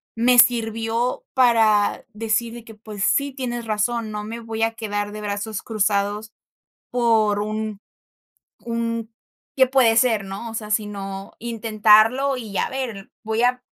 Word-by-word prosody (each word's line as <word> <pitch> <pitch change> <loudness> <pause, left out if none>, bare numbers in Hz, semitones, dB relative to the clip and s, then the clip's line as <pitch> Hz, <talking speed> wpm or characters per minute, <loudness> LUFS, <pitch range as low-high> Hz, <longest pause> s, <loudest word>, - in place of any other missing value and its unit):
me 245 +2 +3
sirvió 230 - +2
para 225 -5 +3
decir 225 +2 -1
de 240 -1 -9
que: 225 - -12
"Pues, 210 -2 -7
sí, 280 0 +1
tienes 240 -3 -4
razón, 220 +1 -1
no 210 0 -4
me 230 +2 -6
voy 225 -1 -3
a 225 0 +1
quedar 205 -2 -3
de 215 - -7
brazos 205 +1 -4
cruzados 210 0 -1 0.6
por 220 -4 +2
un 215 -1 -4 0.8
un 230 -1 -3 0.4
qué 260 -1 +6
puede 250 -3 +3
ser, 225 -4 +3
¿no? 195 +4 -6
O - - -10
sea, 215 -1 -5
sino 200 -2 -3
intentarlo 225 +3 +3
y 215 -5 -7
a - - +1
ver, 235 -7 -5
voy 220 +1 -1
a 250 0 +2
225 Hz, 150 wpm, -22 LUFS, 210-235 Hz, 0.8 s, qué